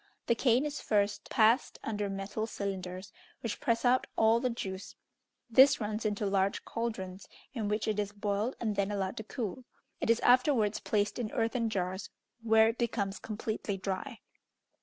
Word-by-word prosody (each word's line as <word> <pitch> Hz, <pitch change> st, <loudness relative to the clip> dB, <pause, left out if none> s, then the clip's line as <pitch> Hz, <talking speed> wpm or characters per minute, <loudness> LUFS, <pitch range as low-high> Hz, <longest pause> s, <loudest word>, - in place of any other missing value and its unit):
The -, -, +3 dB
cane 245 Hz, +3 st, +3 dB
is 300 Hz, 0 st, -4 dB
first 205 Hz, -1 st, 0 dB
passed 230 Hz, +2 st, +3 dB
under 210 Hz, -2 st, -2 dB
metal 195 Hz, +3 st, -3 dB
cylinders, 190 Hz, -2 st, -5 dB, 0.3 s
which 230 Hz, -, -3 dB
press 230 Hz, +1 st, 0 dB
out 255 Hz, +1 st, +3 dB
all 225 Hz, +1 st, +4 dB
the 255 Hz, +1 st, 0 dB
juice; 195 Hz, -5 st, -5 dB, 0.5 s
this 265 Hz, +4 st, +6 dB
runs 215 Hz, 0 st, -2 dB
into 205 Hz, 0 st, -2 dB
large 195 Hz, 0 st, +1 dB
cauldrons, 200 Hz, -5 st, -4 dB, 0.3 s
in 225 Hz, -5 st, -2 dB
which 210 Hz, +1 st, -1 dB
it 210 Hz, -1 st, 0 dB
is 205 Hz, -1 st, -1 dB
boiled 205 Hz, +3 st, -1 dB
and 215 Hz, -3 st, -1 dB
then 200 Hz, 0 st, +1 dB
allowed 195 Hz, -2 st, -2 dB
to 220 Hz, -, -4 dB
cool. 225 Hz, +1 st, -5 dB, 0.4 s
It -, -, -2 dB
is 230 Hz, 0 st, +4 dB
afterwards 245 Hz, -4 st, +4 dB
placed 210 Hz, +2 st, 0 dB
in 225 Hz, -3 st, -3 dB
earthen 230 Hz, 0 st, 0 dB
jars, 185 Hz, -2 st, -3 dB, 0.3 s
where 225 Hz, -1 st, +5 dB
it 230 Hz, -, -4 dB
becomes 205 Hz, -5 st, -1 dB
completely 215 Hz, -2 st, -3 dB
dry. 195 Hz, +6 st, -4 dB
215 Hz, 165 wpm, -31 LUFS, 200-230 Hz, 0.5 s, this